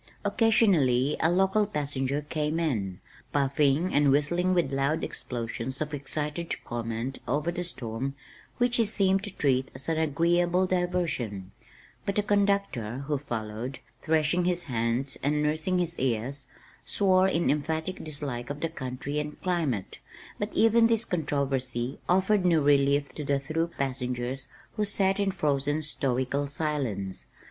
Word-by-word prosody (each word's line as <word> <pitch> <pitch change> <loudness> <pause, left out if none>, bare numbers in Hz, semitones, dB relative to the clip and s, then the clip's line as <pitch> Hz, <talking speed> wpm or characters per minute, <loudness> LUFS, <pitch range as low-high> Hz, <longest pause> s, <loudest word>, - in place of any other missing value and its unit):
Occasionally 190 - +3
a 160 - +3
local 190 +4 +3
passenger 145 -5 -2
came 155 +1 -1
in, 105 - -1 0.3
puffing 145 +4 +2
and 145 -1 +4
whistling 175 +6 +2
with 165 -6 +1
loud 140 +3 +1
explosions 120 +1 -4
of 150 0 -3
excited 150 +3 -3
comment 115 +2 -4
over 150 +6 0
the 175 - -3
storm 135 -4 -3 0.4
which 245 0 +2
he 230 - +4
seemed 195 -2 +2
to 200 -2 -8
treat 130 -2 +2
as 130 - -5
an 160 -1 +1
agreeable 175 +4 +2
diversion, 175 - -1 0.5
but 200 - -2
the 210 - +2
conductor, 200 - 0
who 145 -1 -1
followed, 120 -1 -4 0.2
threshing 160 +2 +2
his 175 -1 0
hands 120 +1 -1
and 150 +2 +1
nursing 155 +5 0
his 170 -1 -1
ears, 130 +2 -1 0.4
swore 190 -2 +3
in 170 -3 +2
emphatic 160 +5 -2
dislike 140 -5 -4
of 145 +1 -5
the 165 - 0
country 135 0 -4
and 150 0 -5
climate, 160 - -1 0.4
but 205 - -1
even 225 +1 +5
this 230 0 +2
controversy 135 -5 -1
offered 190 +2 +3
no 170 -3 +4
relief 140 0 +3
to 150 - -5
the 140 0 +1
through 160 +4 -1
passengers 125 -1 -2 0.3
who 210 - +2
sat 195 -1 +2
in 200 -1 +2
frozen 145 -5 0
stoical 140 -1 +1
silence. 135 -11 -3
150 Hz, 140 wpm, -28 LUFS, 130-180 Hz, 0.5 s, even